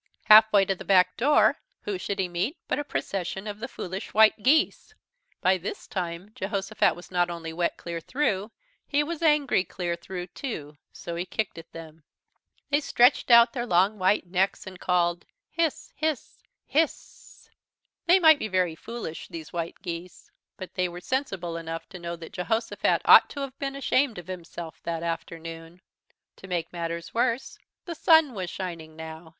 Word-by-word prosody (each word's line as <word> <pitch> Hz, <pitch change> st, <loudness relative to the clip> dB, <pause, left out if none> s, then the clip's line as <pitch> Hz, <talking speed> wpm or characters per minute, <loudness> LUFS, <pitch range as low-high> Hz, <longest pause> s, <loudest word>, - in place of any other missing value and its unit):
Half 220 Hz, +1 st, +8 dB
way 200 Hz, -2 st, +5 dB
to 195 Hz, -, +1 dB
the 185 Hz, -, -9 dB
back 185 Hz, -2 st, +4 dB
door, 285 Hz, +5 st, +4 dB, 0.2 s
who 200 Hz, -3 st, -4 dB
should 200 Hz, +2 st, -3 dB
he 190 Hz, -, 0 dB
meet 180 Hz, -, -2 dB
but -, -, -1 dB
a -, -, -1 dB
procession 190 Hz, -7 st, -4 dB
of 210 Hz, -1 st, -6 dB
the 235 Hz, -, -4 dB
Foolish 190 Hz, -4 st, -7 dB
White 220 Hz, 0 st, +6 dB
Geese. 315 Hz, -, +2 dB, 0.5 s
By 185 Hz, 0 st, +3 dB
this 185 Hz, -, -6 dB
time 180 Hz, +1 st, -5 dB
Jehosophat 195 Hz, -1 st, 0 dB
was 175 Hz, -, -13 dB
not 175 Hz, -1 st, +1 dB
only 165 Hz, -1 st, -6 dB
wet 170 Hz, +1 st, -1 dB
clear 170 Hz, -1 st, -5 dB
through, 210 Hz, -, -1 dB, 0.4 s
he 290 Hz, +1 st, +2 dB
was 335 Hz, +1 st, -5 dB
angry 295 Hz, -, +3 dB
clear 175 Hz, -3 st, -3 dB
through 180 Hz, +1 st, -6 dB
too, 155 Hz, -, -6 dB, 0.2 s
so 170 Hz, -, -7 dB
he 170 Hz, -, -2 dB
kicked 210 Hz, -6 st, -3 dB
at 165 Hz, -, -14 dB
them. 160 Hz, -1 st, -11 dB, 0.7 s
They 290 Hz, +1 st, +3 dB
stretched 250 Hz, -2 st, +3 dB
out 235 Hz, 0 st, +7 dB
their 245 Hz, -2 st, -3 dB
long 195 Hz, +3 st, +3 dB
white 185 Hz, +1 st, +2 dB
necks 185 Hz, +2 st, 0 dB
and 185 Hz, -2 st, -9 dB
called: 175 Hz, -1 st, +1 dB, 0.3 s
"Hiss! 330 Hz, -2 st, -1 dB
Hiss! 310 Hz, -2 st, -3 dB, 0.3 s
Hissssssss!!" 315 Hz, +2 st, -2 dB, 0.6 s
They 350 Hz, +2 st, +7 dB
might 315 Hz, -4 st, +7 dB
be -, -, -2 dB
very 185 Hz, -4 st, +1 dB
foolish, 190 Hz, -2 st, -7 dB
these 160 Hz, -2 st, -9 dB
White 170 Hz, +2 st, -5 dB
Geese, 175 Hz, 0 st, -7 dB, 0.3 s
but 185 Hz, -, -8 dB
they 180 Hz, -2 st, 0 dB
were 175 Hz, +1 st, -8 dB
sensible 190 Hz, -8 st, -3 dB
enough 165 Hz, 0 st, -6 dB
to 185 Hz, -, -9 dB
know 170 Hz, 0 st, -5 dB
that 165 Hz, -1 st, -11 dB
Jehosophat 225 Hz, +5 st, 0 dB
ought -, -, +8 dB
to 285 Hz, -, -6 dB
have 275 Hz, -1 st, -6 dB
been 275 Hz, -1 st, -3 dB
ashamed 265 Hz, -3 st, +1 dB
of 175 Hz, -, -8 dB
himself 170 Hz, -2 st, -8 dB
that 165 Hz, -1 st, -4 dB
afternoon. 165 Hz, 0 st, -6 dB, 0.6 s
To 190 Hz, -, -12 dB
make 175 Hz, -2 st, -3 dB
matters 170 Hz, 0 st, -4 dB
worse, 235 Hz, +2 st, -1 dB, 0.3 s
the 345 Hz, -, -4 dB
sun 320 Hz, -4 st, +5 dB
was 185 Hz, -4 st, -4 dB
shining 170 Hz, -4 st, -6 dB
now. 160 Hz, +1 st, -9 dB
185 Hz, 175 wpm, -26 LUFS, 170-235 Hz, 0.7 s, Half